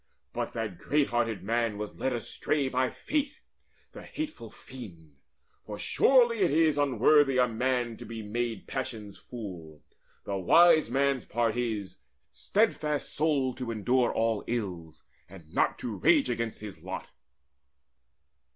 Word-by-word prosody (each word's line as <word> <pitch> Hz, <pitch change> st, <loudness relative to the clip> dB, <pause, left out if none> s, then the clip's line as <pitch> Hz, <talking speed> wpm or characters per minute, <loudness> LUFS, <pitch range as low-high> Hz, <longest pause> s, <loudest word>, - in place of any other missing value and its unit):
But -, -, -3 dB
that 110 Hz, -6 st, -4 dB
great 145 Hz, -1 st, +1 dB
hearted 115 Hz, -3 st, -1 dB
man 115 Hz, 0 st, 0 dB
was 105 Hz, 0 st, -7 dB
led 130 Hz, -, 0 dB
astray 135 Hz, +4 st, -1 dB
By 130 Hz, 0 st, +1 dB
Fate, 290 Hz, -, -3 dB, 0.5 s
the -, -, -10 dB
hateful 295 Hz, -, -6 dB
fiend; 85 Hz, -, -12 dB, 0.5 s
for 105 Hz, -1 st, -7 dB
surely 240 Hz, -, +4 dB
it 185 Hz, -3 st, +3 dB
is 155 Hz, 0 st, +3 dB
Unworthy 140 Hz, 0 st, +4 dB
a 125 Hz, -1 st, +4 dB
man 120 Hz, 0 st, -1 dB
to -, -, -9 dB
be 115 Hz, -1 st, -7 dB
made 115 Hz, 0 st, -3 dB
passion's 110 Hz, -6 st, -5 dB
fool. 85 Hz, -, -9 dB, 0.4 s
The 100 Hz, -, -3 dB
wise 160 Hz, -, +5 dB
man's 135 Hz, 0 st, +1 dB
part 115 Hz, -1 st, 0 dB
is, 110 Hz, -5 st, -3 dB, 0.3 s
steadfast 155 Hz, -9 st, 0 dB
souled 140 Hz, -4 st, +1 dB
to 125 Hz, -2 st, -4 dB
endure 120 Hz, +3 st, +1 dB
All 115 Hz, -2 st, 0 dB
ills, 90 Hz, -9 st, -4 dB, 0.3 s
and 85 Hz, -4 st, -14 dB
not -, -, +2 dB
to 115 Hz, -4 st, -5 dB
rage 140 Hz, -, +4 dB
against 115 Hz, -2 st, -3 dB
his 105 Hz, -3 st, -9 dB
lot." -, -, -7 dB
120 Hz, 140 wpm, -29 LUFS, 105-140 Hz, 0.5 s, wise